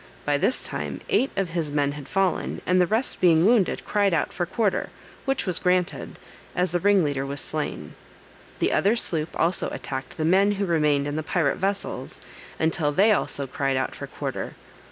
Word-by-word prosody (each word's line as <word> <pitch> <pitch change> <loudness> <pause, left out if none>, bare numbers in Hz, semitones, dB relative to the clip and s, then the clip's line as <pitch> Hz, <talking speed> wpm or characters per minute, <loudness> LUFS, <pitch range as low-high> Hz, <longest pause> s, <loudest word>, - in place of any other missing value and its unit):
By 145 -1 +1
this 255 - +1
time - - -4
eight 285 - +2
of 195 -3 0
his 165 -3 -2
men 145 -1 +1
had 145 -1 -8
fallen, 195 -1 0
and 180 0 +3
the 180 - +3
rest 225 +6 0
being 170 -2 +5
wounded, 220 -4 +2
cried 200 -4 +2
out 155 - -1
for 175 -1 -2
quarter, 205 +1 0 0.4
which 270 -1 0
was 185 -4 +1
granted, 180 -1 0 0.4
as 180 -1 +1
the 175 - +1
ringleader 165 -8 +2
was 140 +1 -3
slain. - - -3 0.6
The - - +1
other 205 +4 +3
sloop 160 -8 -1
also 170 +2 +1
attacked 130 -1 -6
the 155 - -1
men 195 +4 +4
who 200 0 -1
remained 150 -5 +2
in 145 +1 -3
the - - 0
pirate 155 -3 0
vessels, 195 +1 -3 0.4
until 160 -2 +1
they 200 +8 +4
also 140 -8 0
cried 135 0 -1
out 130 - -1
for - - -7
quarter. - - -5
175 Hz, 185 wpm, -25 LUFS, 145-195 Hz, 0.6 s, being